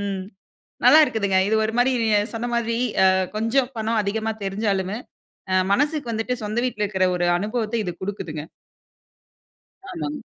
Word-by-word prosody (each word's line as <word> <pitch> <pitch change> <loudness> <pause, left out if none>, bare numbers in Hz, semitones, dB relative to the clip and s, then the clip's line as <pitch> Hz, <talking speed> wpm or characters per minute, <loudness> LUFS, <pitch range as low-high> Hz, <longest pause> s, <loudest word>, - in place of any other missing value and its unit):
ம் 195 -2 -3 0.6
நல்லாயிருக்குதுங்க. 220 -11 +5
இது 220 - +2
ஒரு 220 - -3
மாரி 245 +2 +4
நீங்க 215 -2 +3 0.2
சொன்ன 230 +2 -3
மாதிரி 230 -1 0 0.3
அ - - +6 0.3
கொஞ்சம் 240 +4 +1
பணம் 220 0 0
அதிகமா 220 +2 -1
தெரிஞ்சாலுமே, 195 0 -1 0.6
அ - - +3 0.2
மனசுக்கு 290 0 0
வந்துட்டு 225 +3 -2
சொந்த 210 +2 -2
வீட்டில 210 -4 -2
இருக்கிற 190 -2 +1
ஒரு 175 0 0
அனுபவத்த 215 +3 -2
இது 180 - -3
குடுக்குதுங்க. 175 -6 -4 1.5
ஆமாங்க. 300 -4 -4
220 Hz, 140 wpm, -23 LUFS, 200-240 Hz, 1.5 s, அ